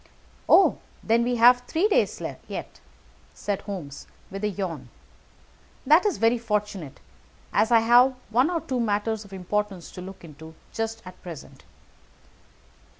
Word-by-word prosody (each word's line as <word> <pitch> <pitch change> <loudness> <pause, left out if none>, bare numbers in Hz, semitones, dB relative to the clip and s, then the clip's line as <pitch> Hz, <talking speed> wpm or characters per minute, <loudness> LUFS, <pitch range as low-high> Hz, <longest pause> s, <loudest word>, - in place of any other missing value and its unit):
"Oh, 390 - +6 0.2
then 230 +1 +3
we 245 +1 0
have 245 +1 +6
three 345 +6 +2
days 420 - +1 0.3
yet," - - -7 0.6
said 205 -2 -3
Holmes, 175 -9 -7 0.2
with 195 +2 -6
a - - +2
yawn. 185 -5 -5 1.0
"That 315 +9 +5
is 395 - -1
very 230 +1 +2
fortunate, 210 - -3 0.5
as 220 - +3
I 230 -1 +6
have 245 +3 +5 0.2
one 250 +7 +3
or 340 -2 -1
two 265 -5 -3
matters 215 -1 -1
of 200 - -16
importance 195 -1 -3
to 180 - -9
look 190 0 -10
into 160 0 -12 0.2
just 225 0 -3
at 185 0 -12
present. 170 -5 -11
210 Hz, 145 wpm, -25 LUFS, 190-240 Hz, 1.0 s, Oh